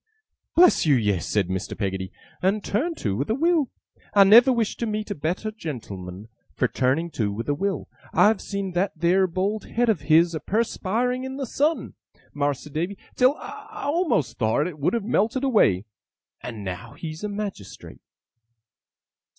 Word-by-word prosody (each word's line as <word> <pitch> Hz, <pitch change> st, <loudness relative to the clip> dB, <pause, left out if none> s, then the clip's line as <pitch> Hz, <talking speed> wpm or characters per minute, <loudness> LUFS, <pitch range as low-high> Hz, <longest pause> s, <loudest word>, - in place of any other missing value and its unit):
'Bless 355 Hz, +2 st, +6 dB
you, 145 Hz, -, +6 dB
yes,' 105 Hz, -7 st, 0 dB
said 100 Hz, -4 st, +1 dB
Mr. 95 Hz, 0 st, -4 dB
Peggotty, 95 Hz, -2 st, -3 dB, 0.3 s
'and 200 Hz, +3 st, +1 dB
turned 315 Hz, -, -1 dB
to 100 Hz, -3 st, -1 dB
with 140 Hz, +7 st, -2 dB
a 220 Hz, -, +2 dB
will. 320 Hz, -1 st, +2 dB, 0.5 s
I 200 Hz, -, +9 dB
never 235 Hz, +7 st, +8 dB
wish 230 Hz, -4 st, 0 dB
to 235 Hz, -, -2 dB
meet 215 Hz, 0 st, -3 dB
a -, -, +1 dB
better 175 Hz, +8 st, -2 dB
gen'l'man 105 Hz, -, -7 dB, 0.3 s
for 125 Hz, -, +2 dB
turning 135 Hz, +8 st, 0 dB
to 105 Hz, -7 st, -1 dB
with 110 Hz, +3 st, -5 dB
a 145 Hz, -, +2 dB
will. 195 Hz, +6 st, -2 dB, 0.2 s
I've 215 Hz, -1 st, +4 dB
seen 200 Hz, -2 st, -4 dB
that 175 Hz, -1 st, -1 dB
theer 185 Hz, +3 st, +3 dB
bald 195 Hz, +5 st, -2 dB
head 240 Hz, 0 st, 0 dB
of 200 Hz, -9 st, +1 dB
his 165 Hz, +2 st, +5 dB
a 160 Hz, -, -2 dB
perspiring 230 Hz, -, -1 dB
in 265 Hz, 0 st, -5 dB
the 275 Hz, -, -2 dB
sun, 300 Hz, +6 st, 0 dB, 0.4 s
Mas'r 145 Hz, 0 st, -2 dB
Davy, 175 Hz, +6 st, -2 dB, 0.2 s
till 255 Hz, +3 st, +4 dB
I 420 Hz, -9 st, -6 dB
a'most 330 Hz, -, 0 dB
thowt 110 Hz, +6 st, +2 dB
it 165 Hz, -4 st, -6 dB
would 145 Hz, +11 st, +1 dB
have 230 Hz, -, -1 dB
melted 230 Hz, +3 st, +1 dB
away. 155 Hz, -, +3 dB, 0.6 s
And 115 Hz, -4 st, -7 dB
now 95 Hz, +2 st, -6 dB
he's 160 Hz, +2 st, -7 dB
a 210 Hz, -, -2 dB
Magistrate. 200 Hz, -, -7 dB
190 Hz, 170 wpm, -24 LUFS, -, 0.6 s, I